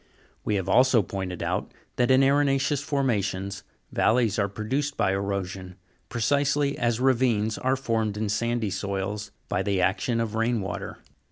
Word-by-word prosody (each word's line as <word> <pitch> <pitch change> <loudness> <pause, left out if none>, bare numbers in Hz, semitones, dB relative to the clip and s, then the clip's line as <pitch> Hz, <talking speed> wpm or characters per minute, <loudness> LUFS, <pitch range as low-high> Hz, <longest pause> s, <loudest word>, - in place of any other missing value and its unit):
We 105 - 0
have 95 -2 -2
also 125 +2 +5
pointed 95 -1 -4
out, - - -2 0.3
that 125 -1 +2
in 130 +1 +5
arena' 140 0 +3
ceous 140 +1 0
formations, 100 -9 -1 0.3
valleys 110 -3 +2
are 100 - +2
produced 135 +8 -2
by 95 - +2
erosion, 95 -2 -3 0.3
precisely 140 +4 +1
as 120 -1 0
ravines 120 -4 +2
are 130 +1 +1
formed 115 -5 -1
in 110 0 -1
sandy 115 0 -1
soils, 100 +1 -3 0.2
by - - 0
the 100 -2 0
action 95 +6 +1
of 115 -2 -2
rain 115 +1 +1
water. 95 -1 -5
110 Hz, 155 wpm, -26 LUFS, 100-130 Hz, 0.3 s, also